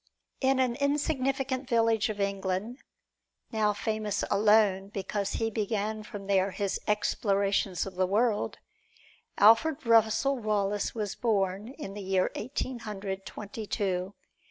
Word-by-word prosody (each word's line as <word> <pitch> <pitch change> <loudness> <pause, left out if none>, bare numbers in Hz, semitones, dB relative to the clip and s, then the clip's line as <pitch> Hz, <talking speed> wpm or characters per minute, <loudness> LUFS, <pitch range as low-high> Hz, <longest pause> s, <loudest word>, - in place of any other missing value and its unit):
In 265 -1 +2
an 250 -2 +1
insignificant 275 -2 0
village 225 -2 +2
of 210 -1 -4
England, 200 +4 -2 0.7
now 215 -2 +2
famous 210 -1 -2
alone 205 -2 +4
because 200 0 -3
he 225 0 -1
began 215 0 -2
from 205 -2 -8
there 195 -1 +2
his 200 0 -2
explorations 200 -3 +1
of 195 - -7
the 185 0 +1
world, 210 +2 +1 0.8
Alfred 255 +8 +5
Russel 230 +4 +3
Wallace 205 -1 -1
was 210 -3 -2
born, 200 -3 0
in 235 -10 -7
the 205 - -6
year 190 -1 +1
Eighteen 255 +2 -4
Hundred 195 -3 -5
Twenty 210 +1 -7
two. 190 -1 -2
210 Hz, 130 wpm, -29 LUFS, 195-230 Hz, 0.8 s, Alfred